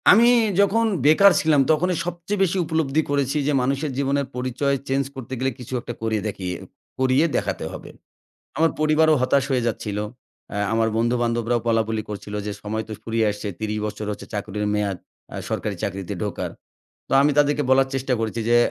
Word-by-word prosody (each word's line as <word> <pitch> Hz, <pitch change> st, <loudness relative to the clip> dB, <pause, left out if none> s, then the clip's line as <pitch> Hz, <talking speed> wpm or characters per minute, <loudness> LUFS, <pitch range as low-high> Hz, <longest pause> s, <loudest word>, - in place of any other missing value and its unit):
আমি 230 Hz, +4 st, +7 dB, 0.3 s
যখন 225 Hz, +3 st, +3 dB, 0.2 s
বেকার 195 Hz, +7 st, +7 dB
ছিলাম 150 Hz, -3 st, +4 dB
তখনই 175 Hz, +3 st, +2 dB
সবচেয়ে 175 Hz, +3 st, -3 dB
বেশি 190 Hz, 0 st, +1 dB
উপলব্ধি 160 Hz, -2 st, +1 dB
করেছি 140 Hz, 0 st, +1 dB
যে, -, -, +3 dB
মানুষের 140 Hz, +3 st, -1 dB
জীবনের 140 Hz, 0 st, +1 dB
পরিচয় 130 Hz, +2 st, 0 dB
চেঞ্জ 135 Hz, +1 st, +1 dB
করতে 130 Hz, -1 st, -7 dB
গেলে 130 Hz, +1 st, 0 dB
কিছু 125 Hz, +1 st, -8 dB
একটা 120 Hz, -, -6 dB
করিয়ে 110 Hz, -2 st, 0 dB
দেখিয়ে 95 Hz, -3 st, -4 dB, 0.4 s
করিয়ে 130 Hz, +4 st, +3 dB
দেখাতে -, -, -1 dB
হবে। -, -, -9 dB, 0.7 s
আমার 160 Hz, 0 st, +3 dB
পরিবারও 155 Hz, +1 st, +4 dB
হতাশ 135 Hz, +1 st, +3 dB
হয়ে 125 Hz, -3 st, +1 dB
যাচ্ছিলো, 105 Hz, -2 st, -2 dB, 0.5 s
আ -, -, -2 dB, 0.2 s
আমার 115 Hz, 0 st, +2 dB
বন্ধুবান্ধবরাও 120 Hz, 0 st, +1 dB
বলাবলি 110 Hz, -1 st, +1 dB
করছিলো 105 Hz, 0 st, -5 dB
যে -, -, -2 dB
সময় 110 Hz, +1 st, -3 dB
তো -, -, -9 dB
ফুরিয়ে 115 Hz, 0 st, 0 dB
আসছে 105 Hz, +1 st, -6 dB
ত্রিশ 110 Hz, -1 st, -2 dB
বছর 105 Hz, 0 st, -4 dB
হচ্ছে 105 Hz, -, -7 dB
চাকরির 105 Hz, 0 st, -3 dB
মেয়াদ 100 Hz, -3 st, -1 dB, 0.4 s
আ -, -, -5 dB
সরকারি 105 Hz, -2 st, -2 dB
চাকরিতে 95 Hz, -2 st, -3 dB
ঢোকার। -, -, -3 dB, 0.6 s
তো -, -, -6 dB
আমি 145 Hz, -, +4 dB
তাদেরকে 145 Hz, 0 st, +3 dB
বলার 135 Hz, 0 st, +5 dB
চেষ্টা 135 Hz, 0 st, -1 dB
করেছি 115 Hz, +1 st, -2 dB
যে, 120 Hz, -, +5 dB
130 Hz, 175 wpm, -23 LUFS, 110-150 Hz, 0.7 s, আমি